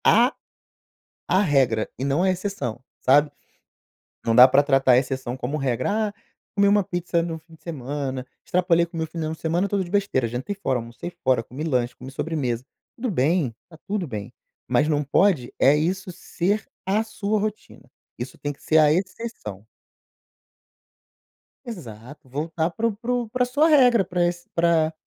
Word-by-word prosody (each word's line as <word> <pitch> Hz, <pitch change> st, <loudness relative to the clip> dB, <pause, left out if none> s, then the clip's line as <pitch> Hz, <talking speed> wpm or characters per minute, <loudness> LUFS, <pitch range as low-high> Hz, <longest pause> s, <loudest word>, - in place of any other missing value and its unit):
A 240 Hz, +5 st, +5 dB, 1.0 s
a 185 Hz, -, +4 dB
regra 130 Hz, -, +2 dB
e 130 Hz, -, -2 dB
não 140 Hz, +5 st, +1 dB
a 190 Hz, -, +3 dB
exceção, 180 Hz, -, -3 dB, 0.2 s
sabe. 145 Hz, +3 st, +4 dB, 0.9 s
Não 115 Hz, -, +2 dB
dá 125 Hz, -, +11 dB
pra 135 Hz, +2 st, +4 dB
tratar 135 Hz, -2 st, +4 dB
a 125 Hz, -, +7 dB
exceção 130 Hz, -1 st, -2 dB
como 130 Hz, +3 st, -3 dB
regra: 130 Hz, -, -1 dB, 0.2 s
“Ah, -, -, -8 dB, 0.4 s
comi 200 Hz, 0 st, +4 dB
uma 205 Hz, -1 st, +4 dB
pizza 175 Hz, -2 st, -1 dB
no 165 Hz, -1 st, -4 dB
fim 160 Hz, +1 st, -19 dB
de 160 Hz, -, -20 dB
semana. 135 Hz, -4 st, -4 dB, 0.2 s
Extrapolei 175 Hz, -1 st, +2 dB
com 170 Hz, 0 st, -12 dB
meu 160 Hz, 0 st, -1 dB
final 160 Hz, -1 st, -4 dB
de 160 Hz, -, -8 dB
semana 170 Hz, +4 st, 0 dB
todo 200 Hz, -1 st, 0 dB
de 175 Hz, -, -10 dB
besteira. 195 Hz, -, +1 dB
Jantei 125 Hz, -, -4 dB
fora, 190 Hz, -10 st, -1 dB
almocei 120 Hz, +8 st, -7 dB
fora, 130 Hz, -3 st, +3 dB
comi 130 Hz, +6 st, -7 dB
lanche, 125 Hz, -5 st, 0 dB
comi 130 Hz, +1 st, -10 dB
sobremesa.” 135 Hz, -5 st, -2 dB, 0.3 s
Tudo 245 Hz, 0 st, -2 dB
bem. 155 Hz, -, +1 dB
Tá 165 Hz, -, -14 dB
tudo 200 Hz, -3 st, -2 dB
bem. 105 Hz, -7 st, -6 dB, 0.4 s
Mas 150 Hz, -, +2 dB
não 150 Hz, -1 st, +1 dB
pode 145 Hz, -3 st, +2 dB
é 140 Hz, +2 st, +6 dB
isso 185 Hz, +5 st, -1 dB
ser 195 Hz, +5 st, -1 dB, 0.2 s
a 205 Hz, +3 st, +2 dB
sua 215 Hz, -1 st, -2 dB
rotina. 215 Hz, +1 st, -5 dB, 0.3 s
Isso 125 Hz, +2 st, -7 dB
tem 145 Hz, -, -3 dB
que 140 Hz, -, -20 dB
ser 160 Hz, -, +3 dB
a 150 Hz, -1 st, +6 dB
exceção. 185 Hz, -, -4 dB, 2.0 s
Exato. 135 Hz, -, -9 dB
Voltar 160 Hz, +5 st, -2 dB
para 225 Hz, +6 st, 0 dB
o 220 Hz, -, -2 dB
para 235 Hz, +3 st, -3 dB
o 245 Hz, -2 st, -1 dB
pra 250 Hz, +2 st, +1 dB
sua 285 Hz, +6 st, +3 dB
regra. 250 Hz, -8 st, +5 dB
Pra 180 Hz, -1 st, -1 dB
esse 175 Hz, 0 st, -3 dB
pra 165 Hz, -2 st, +3 dB
160 Hz, 175 wpm, -24 LUFS, 130-195 Hz, 2.0 s, dá